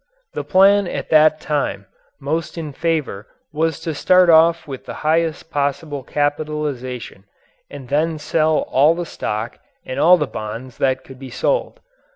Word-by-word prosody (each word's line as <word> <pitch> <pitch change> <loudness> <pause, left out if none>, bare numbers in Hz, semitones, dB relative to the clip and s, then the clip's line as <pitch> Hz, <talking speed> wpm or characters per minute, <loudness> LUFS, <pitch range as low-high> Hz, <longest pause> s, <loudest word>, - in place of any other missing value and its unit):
The - - -4
plan 195 +1 +4
at - - -5
that 155 0 +5
time 145 -11 -2 0.3
most 155 +4 -3
in 155 -3 -5
favor 150 -10 -2 0.3
was 160 0 -1
to 165 - -3
start 180 +3 +4
off 165 +1 +4
with 135 -2 -8
the - - -7
largest 160 +1 0
possible 145 0 -2
capitalization 145 -7 -3 0.4
and 140 -3 -10
then 155 +4 0
sell 155 +1 +1
all 150 +5 +4
the 175 0 -4
stock 110 -6 -5 0.3
and 130 - -5
all 180 +3 +6
the 150 - 0
bonds 115 +1 -7
that 130 -1 0
could 130 -1 -13
be 135 -1 -9
sold. - - -1
150 Hz, 155 wpm, -20 LUFS, 135-165 Hz, 0.4 s, all